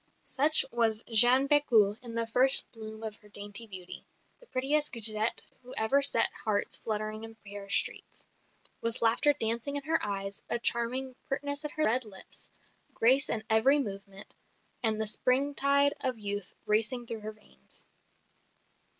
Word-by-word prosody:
Such 295 +1 +2
was 225 -2 -1
Jeanne 245 +5 +5
Bécu 235 -9 +2
in 235 -2 -10
the 230 0 0
first 255 +4 +6
bloom 220 -1 -10
of 215 -1 -6
her 210 - -22
dainty 205 +2 -5
beauty, 185 -3 -11 0.3
the - - -21
prettiest 290 +2 0
grisette 220 -1 +3 0.2
who 250 0 -5
ever 220 +6 +2
set 275 -5 +6
hearts 210 -2 -2
fluttering 215 0 -5
in 225 0 -10
Paris 200 0 -3
streets; - - -2 0.5
with 230 0 -3
laughter 235 +6 +3
dancing 235 +1 -1
in 285 - -3
her 320 +2 -1
eyes, 195 -1 -5
a - - +2
charming 245 +2 0
pertness 285 +2 -3
at 300 - -4
her 310 - 0
red 250 +4 0
lips, 200 -4 -7 0.5
grace 265 +5 +2
in 220 - -1
every 225 +6 +3
movement, 195 -6 -7 0.5
and 220 -2 +2
the 220 - +2
springtide 280 +5 +1
of 255 -3 0
youth 205 -2 -6
racing 220 +3 0
through 230 -1 -6
her 215 0 -8
veins. 215 0 -13
230 Hz, 155 wpm, -28 LUFS, 215-265 Hz, 0.5 s, first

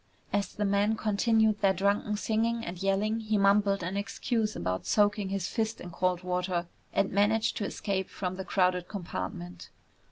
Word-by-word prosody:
As 200 -2 -1
the 210 - 0
men 200 +2 +2
continued 220 0 +2
their 195 -1 +4
drunken 200 +2 +1
singing 230 +2 0
and 175 0 -6
yelling 200 +3 +1
he 215 -1 0
mumbled 200 -1 +3
an 180 +3 -3
excuse 220 +1 -1
about 90 0 -3
soaking 205 -1 +2
his 195 -2 -2
fist 220 0 -2
in 175 - -8
cold 180 +1 0
water 180 -1 -1 0.3
and 195 - +1
managed 210 +3 +2
to 205 - -1
escape 195 -2 -2
from 185 -1 -4
the 190 - -5
crowded 180 -2 +1
compartment. 95 - -6
200 Hz, 165 wpm, -29 LUFS, 180-215 Hz, 0.3 s, their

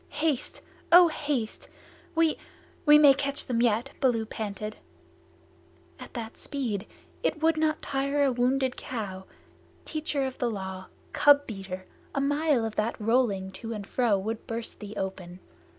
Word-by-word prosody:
"Haste! 300 -5 -1 0.3
O 350 0 +9
haste! 285 -8 -3 0.5
We 325 -1 +3 0.5
we 295 0 +9
may 290 -2 +8
catch 280 +1 -2
them 240 -3 0
yet!" 240 +3 +2
Baloo 240 -5 +2
panted. 215 -1 -5 1.2
"At - - -11
that 225 -1 -6
speed! 235 -9 -3 0.3
It 310 - -1
would 325 0 +4
not 310 0 0
tire 275 +1 0
a 275 - +3
wounded 255 +1 +1
cow. 195 -6 -5 0.6
Teacher 300 -3 -1
of 260 -1 -5
the 245 - +1
Law 190 -3 -5 0.3
cub 285 0 +6
beater 195 -3 -6 0.3
a - - +1
mile 285 -3 +2
of 220 - -4
that 220 +3 -1
rolling 210 -4 +1
to 230 0 -4
and 210 -2 -6
fro 230 -2 +2
would 220 +3 -4
burst 230 0 -5
thee 210 0 -8
open. 190 -2 -5
240 Hz, 150 wpm, -28 LUFS, 210-285 Hz, 1.2 s, O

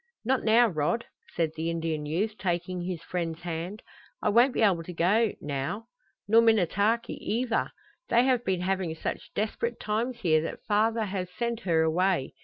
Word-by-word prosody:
"Not 260 +2 +1
now, 230 +2 +5
Rod," 180 +6 -1 0.3
said 165 -2 +1
the 160 +1 -2
Indian 160 -3 -2
youth, 205 +8 -1
taking 180 -1 -2
his 175 -2 -4
friend's 170 -2 -3
hand. 175 +5 -5 0.4
"I - - +1
won't 240 +5 +5
be - - +2
able 190 -5 +3
to 180 +2 -8
go 205 +7 +2
now. 145 - -4 0.4
Nor 225 +2 +6
Minnetaki 220 +1 +2
either. 230 +1 0 0.4
They 235 +1 +5
have 255 -3 +2
been 185 -4 0
having 185 -3 -1
such - - -5
desperate 230 +2 -2
times 235 +3 -2
here 155 -4 +3
that 165 - -6
father 220 +2 +2
has 185 -2 -3
sent 235 +4 -3
her 165 -7 +2
away. 170 -2 +1
190 Hz, 170 wpm, -28 LUFS, 165-225 Hz, 0.4 s, Nor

